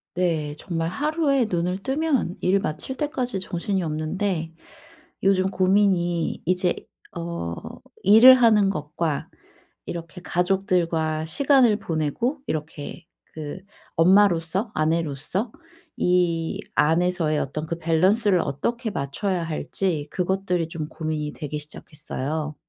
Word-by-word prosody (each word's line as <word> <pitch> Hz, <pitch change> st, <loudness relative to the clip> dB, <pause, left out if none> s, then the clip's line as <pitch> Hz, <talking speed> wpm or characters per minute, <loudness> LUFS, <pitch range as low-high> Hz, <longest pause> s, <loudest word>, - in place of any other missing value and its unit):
네. 160 Hz, -5 st, 0 dB
정말 165 Hz, -2 st, -2 dB
하루에 285 Hz, -, +1 dB
눈을 180 Hz, 0 st, -1 dB
뜨면 270 Hz, -, 0 dB
일 190 Hz, +2 st, +3 dB
마칠 225 Hz, +13 st, -4 dB
때까지 260 Hz, -7 st, -2 dB
정신이 185 Hz, +1 st, -2 dB
없는데 160 Hz, +2 st, -2 dB, 0.7 s
요즘 190 Hz, -1 st, +3 dB
고민이 185 Hz, -3 st, +2 dB
이제 180 Hz, +1 st, +2 dB, 0.4 s
어 170 Hz, -, -4 dB, 0.5 s
일을 225 Hz, +6 st, +9 dB
하는 215 Hz, -5 st, +5 dB
것과 150 Hz, -2 st, -3 dB, 0.6 s
이렇게 170 Hz, 0 st, -7 dB
가족들과 175 Hz, -4 st, 0 dB
시간을 255 Hz, -, +4 dB
보내고 170 Hz, -, -1 dB
이렇게 155 Hz, +2 st, -5 dB, 0.3 s
그 150 Hz, -2 st, -6 dB, 0.4 s
엄마로서, 185 Hz, +2 st, +3 dB
아내로서 160 Hz, -, -1 dB, 0.5 s
이 175 Hz, -2 st, +1 dB, 0.2 s
안에서의 165 Hz, -1 st, +2 dB
어떤 155 Hz, +3 st, -3 dB
그 170 Hz, -, -3 dB
밸런스를 185 Hz, +5 st, +3 dB
어떻게 230 Hz, -, -2 dB
맞춰야 175 Hz, +5 st, -2 dB
할지 165 Hz, 0 st, -2 dB
그것들이 180 Hz, -2 st, 0 dB
좀 155 Hz, -2 st, -4 dB
고민이 155 Hz, -2 st, -3 dB
되기 150 Hz, -1 st, -5 dB
시작했어요. 150 Hz, 0 st, -4 dB
175 Hz, 255 characters per minute, -24 LUFS, 155-195 Hz, 0.7 s, 일을